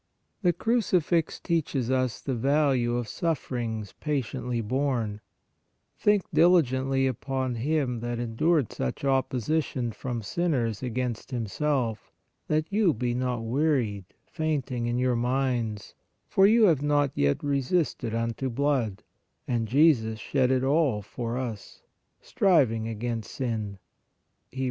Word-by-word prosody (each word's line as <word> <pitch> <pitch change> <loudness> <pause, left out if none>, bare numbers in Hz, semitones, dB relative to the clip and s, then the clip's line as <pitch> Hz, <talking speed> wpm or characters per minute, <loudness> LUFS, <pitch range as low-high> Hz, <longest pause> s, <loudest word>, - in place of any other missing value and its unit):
The 180 -3 +4
Crucifix 175 -5 +1
teaches 140 -7 -1
us 130 -2 0
the 135 - -2
value 130 -1 +2
of 120 -2 -3
sufferings 120 - -3
patiently 130 -4 -2
borne: 115 -3 -1 0.4
" - - -49
Think 210 -2 +3
diligently 135 -5 +3
upon 130 0 -2
Him 130 0 -1
that 120 +1 -3
endured 120 +5 +1
such 65 - -3
opposition 130 -1 0
from 120 0 -5
sinners 120 - -1
against 125 -2 -3
Him 120 -4 -2
self, 125 -2 -1 0.4
that 155 0 +1
you 205 - +3
be 120 +1 -1
not 125 -1 -1
wearied, 120 - 0 0.2
fainting 140 -7 -2
in 120 +1 0
your 125 0 +2
minds, 120 -3 -1 0.3
for 195 0 +5
you 225 +2 +5
have 165 -9 +4
not 145 -1 +2
yet 70 0 +1
resisted 140 -4 0
unto 115 +3 -2
blood 125 -6 0 0.4
(and 115 -2 0
Jesus 120 -4 +3
shed 130 +2 +1
it 130 -1 +2
all 135 -6 +2
for 115 +3 -4
us), 115 -6 -6 0.4
striving 125 - +2
against 115 -1 -4
sin" 110 -6 -3 0.7
(Hebr. 130 - -8
130 Hz, 125 wpm, -27 LUFS, 115-145 Hz, 0.7 s, for